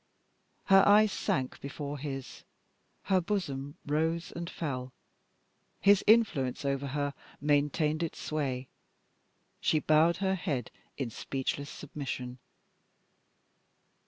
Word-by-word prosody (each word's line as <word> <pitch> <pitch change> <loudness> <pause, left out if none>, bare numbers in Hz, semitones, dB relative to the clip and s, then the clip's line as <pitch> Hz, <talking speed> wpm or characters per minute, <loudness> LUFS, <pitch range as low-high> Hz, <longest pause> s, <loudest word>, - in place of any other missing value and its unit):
Her 195 0 +7
eyes 210 +1 +6
sank 130 -7 -1
before 145 0 -5
his; 135 -2 -6 0.6
her 190 -1 +2
bosom 145 -8 -3
rose 160 +3 0
and 170 +1 -4
fell 130 -6 -3
rapidly. 130 - -16 1.0
His 205 - +4
influence 170 - +3
over 140 0 0
her 145 +1 -2 0.3
maintained 150 +2 +1
its 165 - -3
sway. 135 -4 -2 0.9
She 155 - +2
bowed 155 +2 +4
her 190 -1 +1
head 155 - -2 0.3
in 130 -4 -3
speechless 140 +4 -3
submission. 130 -4 -6
145 Hz, 105 wpm, -30 LUFS, 135-170 Hz, 1.0 s, Her